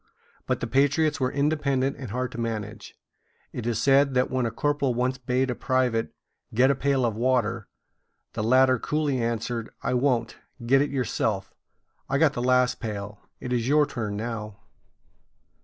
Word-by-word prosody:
But - - -1
the - - -1
patriots 145 +3 +2
were 130 -1 0
independent 140 -2 0
and 130 -5 -7
hard 125 +3 -3
to 120 - -7
manage. 110 -2 -5 0.6
It 120 -1 -4
is 115 -2 0
said 135 +2 +4
that 125 0 +2
when 130 -2 0
a - - -1
corporal 140 0 0
once 125 +2 -1
bade 125 +1 0
a - - 0
private 125 -3 0 0.4
get 130 +4 +5
a - - +1
pail 135 -1 +1
of 115 -3 -1
water, 115 -3 0 0.7
the 110 - -3
latter 130 +2 +4
coolly 150 -2 -1
answered: 115 0 -2
"I - - 0
won't. 125 -2 0 0.3
Get 135 +3 +4
it 145 - 0
yourself. 110 -6 -2 0.6
I - - +1
got - - +3
the 120 - -3
last 125 0 +2
pail; 105 -2 -5 0.2
it 125 -1 -4
is 120 -1 0
your 150 +2 +4
turn 110 -7 -4
now." 105 -2 -5
125 Hz, 170 wpm, -26 LUFS, 115-135 Hz, 0.7 s, get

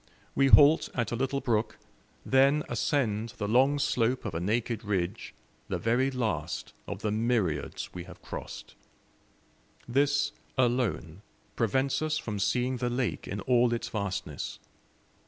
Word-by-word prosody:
We 135 - +3
halt 145 +3 +7
at 120 -2 -1
a - - 0
little 135 +3 -1
brook, 110 -2 0 0.5
then 140 +3 +4
ascend 115 -3 -1
the 105 - -2
long 130 +6 +4
slope 125 -2 +1
of - - -3
a 80 - -2
naked 110 +4 -1
ridge, 100 0 -2 0.3
the - - -2
very 125 +4 +1
last 110 - -3
of - - -6
the 105 - 0
myriads 105 - -1
we 90 -1 -7
have 90 -1 -12
crossed. - - -8 1.1
This 145 +3 +2 0.3
alone 120 -8 0 0.3
prevents 130 +6 +1
us 155 0 0
from 105 -8 -4
seeing 125 +6 +1
the 125 0 -1
lake 125 -1 -2
in 100 +1 -4
all 120 +1 +3
its 115 - -4
vastness. 100 -7 -4
120 Hz, 140 wpm, -29 LUFS, 105-130 Hz, 1.1 s, halt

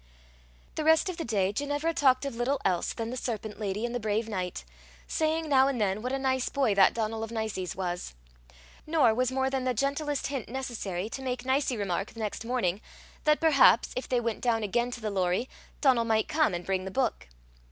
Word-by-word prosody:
The 310 - -3
rest 320 +5 +4
of 360 - -5
the 330 - -3
day 200 -5 0
Ginevra 290 +6 -1
talked 265 -3 +3
of 275 - -4
little 255 +4 0
else 180 -3 +1
than 225 0 -4
the - - -4
serpent 220 -3 -4
lady 210 +1 -2
and 240 - -4
the 245 - -1
brave 220 +1 -1
knight, 180 - -4 0.4
saying 320 0 0
now 270 -2 +5
and 270 -3 -1
then 205 0 0
what 250 +2 -3
a 270 - 0
nice 260 -1 0
boy 265 -7 +1
that 195 -1 +5
Donal 225 0 -2
of 225 - -5
Nicie's 220 -5 -3
was. 175 - -4 0.7
Nor 300 -8 +4
was 255 +2 +1
more 265 0 0
than 265 -1 -1
the 255 -1 0
gentlest 285 +3 -1
hint 275 -4 -4
necessary 225 -7 -4
to 270 - -6
make 255 -1 -3
Nicie 260 -1 +1
remark, 195 -1 -2
the - - -9
next 215 0 -3
morning, 230 -6 -1 0.4
that 305 0 +4
perhaps, 290 -7 +5
if 255 - -4
they 250 - +2
went 230 -2 -2
down 230 -3 +1
again 235 +4 0
to 245 -1 -7
the 215 -1 -2
Lorrie, 185 +4 0 0.3
Donal 260 -5 +4
might 220 -1 +1
come, 310 - +2
and 175 - -5
bring 190 -1 -1
the - - -4
book. 245 - -1
240 Hz, 215 wpm, -28 LUFS, 210-270 Hz, 0.7 s, now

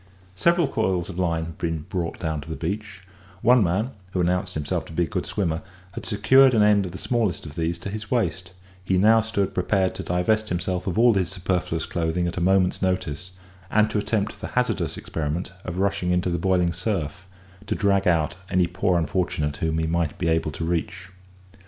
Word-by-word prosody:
Several 170 - +3
coils 90 -7 -1
of 90 - -7
line 85 -3 0
had 80 -1 -9
been 80 -2 -2
brought 90 -3 -3
down 80 -2 -2
to 80 - -11
the 80 - -3
beach; 95 +2 -4 0.4
one 125 0 +6
man, 100 +8 0 0.2
who 90 - 0
announced 90 +1 0
himself 75 -2 -2
to - - -11
be 85 - +1
a - - -2
good - - -3
swimmer, 85 -5 -1 0.3
had - - -6
secured 125 +5 +5
an 105 - +5
end 105 -2 +4
of - - -7
the 95 - -7
smallest 115 -9 -1
of 75 - -8
these 85 +1 -1
to 90 - -6
his 105 0 -6
waist; 95 -7 -1 0.3
he 95 0 +1
now 110 +4 +6
stood 105 -3 -1
prepared 95 0 +1
to - - -6
divest 110 +5 0
himself 90 +1 -2
of 95 - -1
all 120 +1 +6
his 95 -4 0
superfluous 90 -1 -2
clothing 85 +1 -1
at 85 - -4
a 90 - -2
moment's 95 0 +2
notice, 90 -2 -2 0.4
and 110 0 +3
to 105 - +1
attempt 105 0 -2
the - - -4
hazardous 125 0 0
experiment 80 +4 -3
of 90 0 -4
rushing 100 -1 0
into 90 0 +1
the 85 - -1
boiling 90 -1 +2
surf, 90 -3 -3 0.4
to - - 0
drag 100 -2 +2
out 80 -3 +2
any 90 -2 +3
poor 90 +1 +1
unfortunate 80 -4 -1
whom 80 -1 -1
he 80 - 0
might 80 -1 -1
be 85 - -1
able 80 -1 +1
to 75 +4 -4
reach. 85 +2 -3
90 Hz, 205 wpm, -24 LUFS, 85-100 Hz, 0.4 s, one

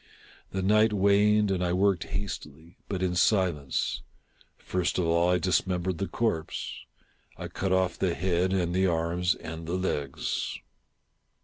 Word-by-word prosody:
The 95 0 -3
night 105 +2 +4
waned, 105 +1 +4
and 90 -1 0
I 90 0 0
worked 95 -2 +2
hastily, 85 -4 -6
but 95 -2 -2
in 90 -1 +1
silence. 85 - +1 0.6
First 90 -1 -1
of 90 - +1
all 85 +1 +3
I 90 - +4
dismembered 90 0 0
the 95 - -1
corpse. 85 -9 -2 0.6
I - - -5
cut 95 -1 -3
off 95 -1 +1
the 90 -3 +1
head 90 0 +1
and 90 -3 0
the 95 +1 +3
arms 85 +1 +1
and 80 0 -8
the 85 - -1
legs. 75 -7 -2
90 Hz, 145 wpm, -28 LUFS, 85-95 Hz, 0.6 s, night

